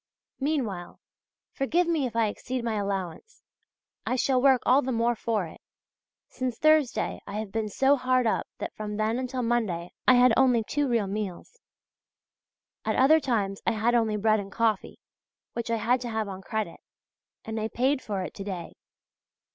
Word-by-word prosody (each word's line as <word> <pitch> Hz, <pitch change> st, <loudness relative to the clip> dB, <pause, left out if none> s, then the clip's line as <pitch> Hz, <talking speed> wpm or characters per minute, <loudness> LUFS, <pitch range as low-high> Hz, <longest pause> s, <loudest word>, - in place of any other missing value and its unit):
Meanwhile, 250 Hz, -, -2 dB, 0.5 s
forgive 330 Hz, +6 st, +1 dB
me 315 Hz, -6 st, +1 dB
if 230 Hz, -, -10 dB
I 230 Hz, -1 st, +3 dB
exceed 245 Hz, +4 st, -4 dB
my 230 Hz, -1 st, -1 dB
allowance; 200 Hz, -, -4 dB, 0.6 s
I 255 Hz, -, -1 dB
shall 255 Hz, 0 st, +2 dB
work 265 Hz, -2 st, +4 dB
all 260 Hz, +3 st, +5 dB
the 260 Hz, -, -2 dB
more 235 Hz, 0 st, +2 dB
for 220 Hz, -4 st, -1 dB
it. 160 Hz, -, -12 dB, 0.7 s
Since 255 Hz, -3 st, -4 dB
Thursday 310 Hz, -4 st, +2 dB
I 200 Hz, -, -7 dB
have 215 Hz, -2 st, -4 dB
been 220 Hz, 0 st, -2 dB
so 270 Hz, +7 st, +3 dB
hard 255 Hz, -1 st, +2 dB
up 220 Hz, -, 0 dB
that -, -, -5 dB
from 210 Hz, -1 st, -5 dB
then 220 Hz, +3 st, 0 dB
until 255 Hz, 0 st, -3 dB
Monday 215 Hz, -8 st, -1 dB, 0.2 s
I 255 Hz, -, +8 dB
had 245 Hz, -1 st, +6 dB
only 250 Hz, -4 st, +4 dB
two 290 Hz, +5 st, -1 dB
real 230 Hz, -4 st, +1 dB
meals. 200 Hz, -, -5 dB, 1.2 s
At -, -, 0 dB
other 300 Hz, +5 st, +6 dB
times 210 Hz, -8 st, -1 dB
I 235 Hz, -, +3 dB
had 225 Hz, +2 st, +1 dB
only 225 Hz, -3 st, +2 dB
bread 215 Hz, +1 st, +3 dB
and 195 Hz, 0 st, -7 dB
coffee, 220 Hz, -1 st, 0 dB, 0.6 s
which 235 Hz, 0 st, -4 dB
I 230 Hz, -, +2 dB
had 240 Hz, +3 st, +1 dB
to 245 Hz, -, -4 dB
have 220 Hz, -2 st, -2 dB
on 190 Hz, -1 st, -7 dB
credit 215 Hz, -4 st, -4 dB, 0.7 s
and 220 Hz, 0 st, -3 dB
I 215 Hz, -, -1 dB
paid 260 Hz, +4 st, +1 dB
for 200 Hz, -4 st, -3 dB
it -, -, -6 dB
to 195 Hz, -, -7 dB
day. 190 Hz, -4 st, -6 dB
230 Hz, 180 wpm, -27 LUFS, 210-255 Hz, 1.2 s, I